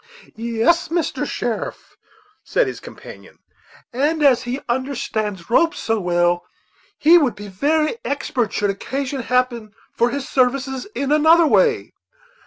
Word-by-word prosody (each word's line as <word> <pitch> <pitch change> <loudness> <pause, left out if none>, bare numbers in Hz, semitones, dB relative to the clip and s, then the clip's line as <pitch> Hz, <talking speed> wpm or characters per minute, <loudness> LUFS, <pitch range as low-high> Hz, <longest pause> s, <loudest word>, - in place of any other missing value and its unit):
"Yes, 235 +10 +1
Mr. 335 0 -2
Sheriff," - - -4 0.5
said - - +1
his - - -5
companion; - - -13 0.6
"and 300 +5 0
as 265 -4 +5
he 250 +2 -4
understands 225 -7 -3
ropes 335 +7 +3
so 225 -1 -1
well, 175 -1 +1 0.6
he 335 +3 +6
would 265 -8 0
be 205 0 -9
very 305 - 0
expert, 265 - -2
should 205 -1 0
occasion 270 +6 -4
happen 240 -3 -1 0.2
for 235 - +2
his 275 +2 -4
services 265 +1 0
in 275 +1 -2
another 320 +3 +5
way." 445 +7 +2
260 Hz, 130 wpm, -20 LUFS, 225-300 Hz, 0.6 s, he